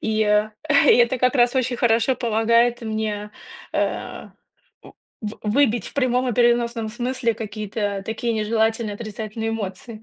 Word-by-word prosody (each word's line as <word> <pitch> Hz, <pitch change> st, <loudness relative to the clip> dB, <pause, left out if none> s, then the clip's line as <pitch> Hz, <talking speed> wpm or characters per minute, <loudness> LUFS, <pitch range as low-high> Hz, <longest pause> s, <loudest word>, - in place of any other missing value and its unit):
И, 220 Hz, 0 st, -1 dB
и -, -, +5 dB, 0.7 s
это 240 Hz, +1 st, +3 dB
как 255 Hz, +2 st, +2 dB
раз 245 Hz, 0 st, +3 dB
очень 255 Hz, -1 st, 0 dB
хорошо 235 Hz, +1 st, +2 dB
помогает 235 Hz, +1 st, +2 dB
мне, 215 Hz, -2 st, -3 dB, 0.4 s
э, -, -, -3 dB, 0.5 s
в 210 Hz, -1 st, -11 dB
выбить 230 Hz, 0 st, +1 dB
в -, -, -17 dB
прямом 255 Hz, -2 st, +1 dB
и -, -, 0 dB
переносном 235 Hz, -2 st, +2 dB
смысле 240 Hz, +1 st, -1 dB
какие-то 205 Hz, -2 st, -4 dB
такие 225 Hz, +1 st, -2 dB
нежелательные 220 Hz, 0 st, 0 dB
отрицательные 220 Hz, +1 st, -5 dB
эмоции. 220 Hz, +1 st, -6 dB
225 Hz, 130 wpm, -22 LUFS, 215-240 Hz, 0.7 s, и